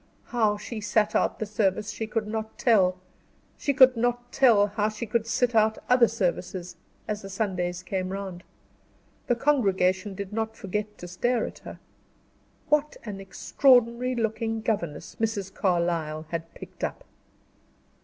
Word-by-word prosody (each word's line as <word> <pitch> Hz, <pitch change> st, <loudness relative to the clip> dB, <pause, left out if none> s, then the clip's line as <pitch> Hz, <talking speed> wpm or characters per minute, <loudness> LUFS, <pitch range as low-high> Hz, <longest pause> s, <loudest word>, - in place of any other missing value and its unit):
How 215 Hz, -4 st, +2 dB
she 215 Hz, +1 st, -6 dB
sat 210 Hz, 0 st, +1 dB
out -, -, +1 dB
the 220 Hz, -, -3 dB
service 205 Hz, 0 st, 0 dB
she 220 Hz, -, -4 dB
could 220 Hz, 0 st, -1 dB
not 220 Hz, 0 st, -5 dB
tell; 190 Hz, -6 st, +3 dB, 0.6 s
she 285 Hz, -, -1 dB
could 260 Hz, -1 st, +7 dB
not 245 Hz, +1 st, -1 dB
tell 235 Hz, -7 st, +5 dB
how 210 Hz, +1 st, -1 dB
she 215 Hz, +2 st, -5 dB
could 225 Hz, +1 st, -1 dB
sit 245 Hz, +1 st, +1 dB
out 220 Hz, 0 st, +3 dB
other 250 Hz, -2 st, +6 dB
services, 180 Hz, -4 st, -2 dB, 0.3 s
as 210 Hz, -1 st, -3 dB
the 195 Hz, -, -8 dB
Sundays 180 Hz, -3 st, -2 dB
came 185 Hz, 0 st, -2 dB
round! 190 Hz, -2 st, -5 dB, 0.9 s
The 245 Hz, -, +3 dB
congregation 195 Hz, -8 st, +1 dB
did 200 Hz, +1 st, -6 dB
not 220 Hz, 0 st, -2 dB
forget 210 Hz, +2 st, -4 dB
to 175 Hz, -, -8 dB
stare 235 Hz, +7 st, 0 dB
at -, -, -8 dB
her. -, -, -10 dB, 0.9 s
What 300 Hz, 0 st, +2 dB
an 205 Hz, -3 st, -6 dB
extraordinary 245 Hz, +4 st, +3 dB
looking 225 Hz, -1 st, -1 dB
governess 200 Hz, -9 st, -3 dB
Mrs. 205 Hz, -4 st, -1 dB
Carlyle 170 Hz, -4 st, 0 dB
had 165 Hz, 0 st, -4 dB
picked -, -, -11 dB
up! -, -, -3 dB
210 Hz, 150 wpm, -26 LUFS, 190-230 Hz, 0.9 s, could